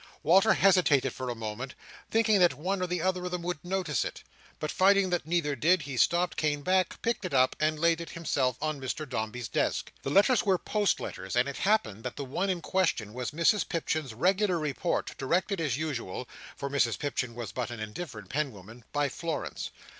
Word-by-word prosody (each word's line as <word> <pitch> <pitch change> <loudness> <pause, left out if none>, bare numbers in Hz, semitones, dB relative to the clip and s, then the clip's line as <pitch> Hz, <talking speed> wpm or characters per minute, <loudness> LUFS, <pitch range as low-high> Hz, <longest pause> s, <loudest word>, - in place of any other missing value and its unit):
Walter 195 +6 +6
hesitated 165 -9 +4
for 130 -1 -5
a 120 - -2
moment, 115 +4 -5 0.3
thinking 220 -2 +3
that 175 -1 +5
one 185 +5 -2
or 180 - -1
other 185 -1 0
of - - -2
them 180 -1 -4
would 175 -3 -3
notice 175 -4 0
it; - - -6 0.4
but 155 - -2
finding 195 0 +4
that 175 -3 -1
neither 160 -4 +1
did, 165 +5 +3
he 140 -1 -5
stopped, 175 +8 +2
came 145 -2 0
back, 185 +1 +1
picked 230 -2 0
it 180 -6 -2
up, 130 0 +4
and 155 0 +1
laid 165 +1 +2
it 170 - -7
himself 135 -7 -1
on 155 -3 -2
Mr 150 +4 -3
Dombey's 120 -1 -3
desk. - - -1
The - - -3
letters 205 - +4
were 195 -3 +3
post 210 +2 0
letters; 95 +3 -5
and 125 +2 +3
it 140 - -5
happened 195 - +1
that 125 - -4
the 140 - -5
one 180 +9 -1
in 180 -2 -1
question 165 - 0
was 125 0 -3
Mrs 170 +8 +2
Pipchin's 155 -7 -2
regular 185 - +2
report, 155 +2 -2
directed 180 +6 0
as 140 -6 0
usual—for 135 -2 -5
Mrs 135 -4 +1
Pipchin 125 -5 -2
was 120 -3 -5
but 125 -2 -3
an 120 -2 -6
indifferent 110 - -7
penwoman—by 125 +1 -3
Florence. 165 +3 -4
155 Hz, 190 wpm, -29 LUFS, 130-180 Hz, 0.4 s, Walter